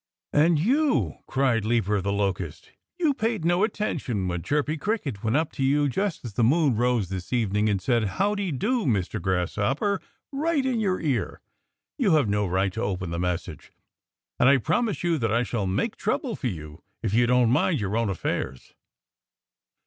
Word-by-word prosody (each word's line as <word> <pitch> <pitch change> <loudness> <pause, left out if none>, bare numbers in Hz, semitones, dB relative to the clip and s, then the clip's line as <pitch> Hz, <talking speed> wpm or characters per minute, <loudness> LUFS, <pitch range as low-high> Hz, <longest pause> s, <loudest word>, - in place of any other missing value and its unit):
"And 155 +2 +4
you 270 - +2
" - - -45
cried 130 -5 +1
Leaper 105 -3 +1
the 100 +2 -1
Locust 100 -1 -2 0.3
"you 320 -5 +2
paid 225 - -1
no 175 +3 +3
attention 145 - -1
when 90 -1 -2
Chirpy 150 - 0
Cricket 150 - -3
went 110 +4 +2
up 160 0 0
to 135 - -3
you 145 +2 +3
just 190 +2 -2
as 115 - -6
the 115 - +1
moon 140 +1 +3
rose 120 -4 +1
this 95 -2 -6
evening 105 -3 +1
and 100 -2 +1
said, 115 +3 +1
'How 195 - 0
dy 200 -4 -2
do, 220 - 0
Mr. 100 -9 0
Grasshopper!' 100 - 0 0.3
right 290 0 0
in 250 -3 0
your 190 -4 0
ear. 145 -6 -1 0.6
You 205 -10 +3
have 145 -7 +3
no 105 0 +1
right 95 +1 0
to 110 - -4
open 95 -5 -2
the 85 - -3
message. 90 -1 -3 0.7
And 125 - +6
I 140 - +6
promise 220 - 0
you 170 -3 +1
that 115 -3 0
I 115 +2 +2
shall 110 -5 -2
make 100 - -1
trouble 220 +2 -1
for 130 - -3
you 75 -8 -7 0.2
if 105 -3 -1
you 120 +2 +4
don't 125 -1 +4
mind 150 +4 +2
your 100 0 -2
own 115 -2 +1
affairs." 65 -8 -3
125 Hz, 185 wpm, -25 LUFS, -, 0.7 s, And